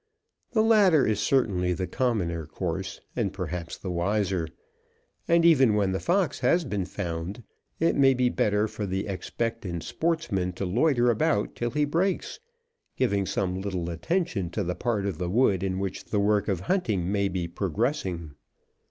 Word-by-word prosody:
The 220 -2 +4
latter 200 - +5
is 110 -2 +1
certainly 100 -7 +1
the 90 +1 -2
commoner 90 - -1
course, 95 +4 -4
and 105 -6 0
perhaps 90 -3 -5
the 95 - -5
wiser. 95 -1 0 0.8
And 170 0 +4
even 135 -10 +5
when 100 -2 +2
the 95 - -1
fox 185 +1 +1
has 170 -1 +2
been 105 -7 -2
found 90 +4 -5 0.4
it 165 - +2
may 135 -1 +5
be 125 0 +2
better 105 -3 +1
for 110 -1 -5
the 95 +1 -2
expectant 100 -2 -3
sportsman 155 - -1
to 95 - -4
loiter 120 - +3
about 105 -2 +1
till 120 - -1
he 150 +3 +1
breaks, 175 +6 -1 0.6
giving 100 -7 +1
some 95 -1 -1
little 90 -4 -3
attention 100 - -1
to 105 +4 -2
the 90 0 -1
part 110 -1 -1
of 95 -5 -3
the 90 -1 -2
wood 100 -3 +3
in 95 -1 -1
which 95 -1 -4
the 105 - -1
work 105 0 +2
of 95 -4 -1
hunting 105 - 0
may 100 -1 +1
be 90 -2 -2
progressing. 90 - -2
100 Hz, 165 wpm, -27 LUFS, 90-125 Hz, 0.8 s, latter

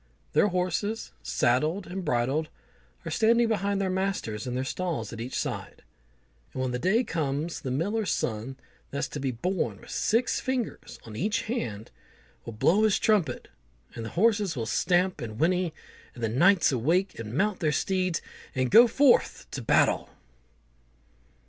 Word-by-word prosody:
Their - - +4
horses, 185 +4 -2
saddled 155 +11 +1
and 190 +1 -5
bridled, 145 +2 0 0.6
are - - -4
standing 230 +1 +3
behind 200 -2 0
their 195 - 0
masters 185 - -2
in 125 - -3
their 130 - -1
stalls 140 - -3
at 115 - -6
each 125 +3 -4
side; - - -4 0.7
and 130 - -4
when 130 - -1
the 125 - -2
day 195 - +2
comes, 160 - -2
the 130 - -4
miller's 200 - -1
son 115 +4 -2 0.3
that's 140 - -2
to 145 - -5
be 135 -1 -1
born 180 +11 -2
with - - -13
six 230 +3 +1
fingers 260 -3 -3
on 110 -2 -9
each 205 - 0
hand, 115 - -4 0.5
will 115 - -6
blow 170 - +3
his 215 -2 +4
trumpet, 185 - +1 0.4
and 115 - -6
the 110 - -5
horses 205 -3 +3
will 115 -3 -2
stamp 180 +8 +1
and 110 -3 -6
whinny, 180 +2 +2 0.4
and 120 - -8
the 115 - +1
knights 170 - +4
awake 165 - +1
and 115 +1 -6
mount 205 +1 +1
their 155 -2 +1
steeds, 185 +1 0 0.3
and 130 -1 0
go 235 +4 +9
forth 270 +3 +3
to 135 - -4
battle. 115 - +2
175 Hz, 160 wpm, -27 LUFS, 125-200 Hz, 0.7 s, go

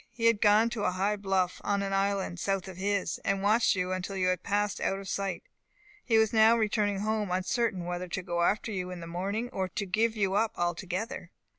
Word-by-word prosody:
He 230 - -4
had 230 -3 +4
gone 215 +2 +5
to 220 -3 -3
a - - +3
high 195 +3 0
bluff, 190 -3 -1
on 200 0 0
an 195 0 -2
island 195 -2 0
south 195 0 -1
of 185 -2 -9
his, 195 -2 -1
and 195 0 0
watched 215 +2 +3
you 180 0 -1
until 185 +1 -3
you 185 -1 +2
had 185 -1 0
passed 205 +1 -1
out 195 - 0
of 195 0 -8
sight. 195 -2 -3 0.6
He 225 -3 +3
was 220 0 +3
now 225 +1 +6
returning 210 -2 0
home, 215 -1 -1
uncertain 185 +1 0
whether 175 +1 -3
to 180 +1 -4
go 175 -1 -2
after 210 +5 +1
you 180 -3 -3
in 180 -1 -6
the 170 - -7
morning, 195 +7 -3
or 190 -4 -2
to 200 +3 -4
give 220 +4 +1
you 195 -2 +1
up 220 +2 +1
altogether. 185 +5 -3
195 Hz, 225 wpm, -29 LUFS, 185-215 Hz, 0.6 s, now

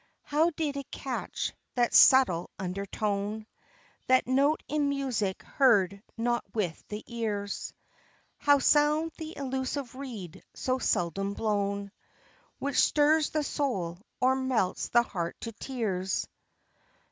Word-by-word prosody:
How 310 +3 +2
did 300 -3 -3
it 280 - -6
catch 265 -3 -4 0.2
that 240 -1 +2
subtle 250 -11 +6
undertone, 200 +3 -3 0.6
That 255 0 +4
note 275 +4 +2
in 295 -1 +1
music 255 -9 -1
heard 200 -7 +3 0.2
not 240 +1 0
with 180 -7 -2
the 210 +1 -6
ears? 210 -4 -3 0.7
How 285 0 +5
sound 300 +3 +3
the 320 0 -7
elusive 265 -1 -3
reed 235 - -8
so 255 0 -1
seldom 195 0 0
blown, 200 -2 -1 0.7
Which 280 0 0
stirs 300 +1 +4
the 310 -1 -1
soul 190 -14 -2 0.2
or 260 +1 +4
melts 260 -8 0
the 240 0 +5
heart 170 -7 -4
to 230 - -4
tears. 210 -6 -2
240 Hz, 120 wpm, -29 LUFS, 200-280 Hz, 0.7 s, subtle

